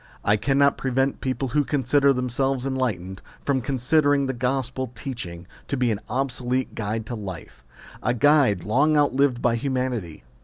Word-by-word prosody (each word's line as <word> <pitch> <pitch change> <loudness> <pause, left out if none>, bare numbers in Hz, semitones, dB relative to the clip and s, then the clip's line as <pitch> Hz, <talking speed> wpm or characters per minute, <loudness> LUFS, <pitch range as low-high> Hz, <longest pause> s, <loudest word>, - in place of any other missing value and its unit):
I 105 - +4
cannot 140 +5 +2
prevent 135 +1 0
people 130 0 -2
who 145 +4 +2
consider 140 0 +2
them 125 -1 -1
selves 135 +1 -1
enlightened, 105 -9 -2 0.2
from 135 -2 +1
considering 140 +3 +2
the 130 - -2
gospel 130 0 -2
teaching 100 -9 -6 0.2
to 140 - -2
be 125 -2 +2
an 105 -1 -3
obsolete 130 0 -1
guide 110 +1 -3
to 120 - -6
life 95 - -8 0.4
a 125 0 0
guide 130 - +4
long 145 +8 +3
outlived 140 -3 +2
by 120 -1 +3
humanity. 125 - -3
130 Hz, 155 wpm, -24 LUFS, 115-135 Hz, 0.4 s, I